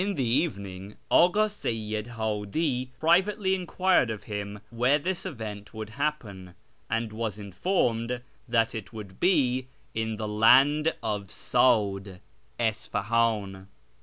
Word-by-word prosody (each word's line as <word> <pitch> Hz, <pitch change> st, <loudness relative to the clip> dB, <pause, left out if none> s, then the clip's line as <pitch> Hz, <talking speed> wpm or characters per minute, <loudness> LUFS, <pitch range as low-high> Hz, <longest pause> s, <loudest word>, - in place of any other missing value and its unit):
lu 200 Hz, 0 st, -1 dB
the 135 Hz, -5 st, 0 dB
evening 100 Hz, -, -2 dB, 0.2 s
Ak;i 180 Hz, +5 st, +5 dB
Seyyid 110 Hz, -, -4 dB
Hikli 115 Hz, +5 st, -1 dB
privately 190 Hz, +4 st, +3 dB
enquired 185 Hz, -6 st, +2 dB
of 110 Hz, -2 st, -5 dB
him 105 Hz, -1 st, -5 dB
where 125 Hz, +5 st, +3 dB
this 185 Hz, +5 st, -3 dB
event 110 Hz, -, -7 dB
would 110 Hz, -1 st, -6 dB
hai)pen, 110 Hz, -10 st, -4 dB, 0.3 s
and 115 Hz, -1 st, -1 dB
was 110 Hz, -2 st, -3 dB
informed 115 Hz, -, -1 dB, 0.3 s
tliat 115 Hz, -2 st, +2 dB
it 110 Hz, -4 st, -6 dB
would 105 Hz, -4 st, -9 dB
be 130 Hz, -8 st, +2 dB, 0.3 s
in 110 Hz, 0 st, -2 dB
the 110 Hz, -1 st, -3 dB
'Land 135 Hz, +9 st, +5 dB
of 105 Hz, -2 st, -2 dB
S;'id 100 Hz, -6 st, +1 dB, 0.2 s
' -, -, -38 dB
(Isfali; 115 Hz, 0 st, +1 dB
in). 95 Hz, 0 st, -13 dB
115 Hz, 130 wpm, -27 LUFS, 105-145 Hz, 0.3 s, Ak;i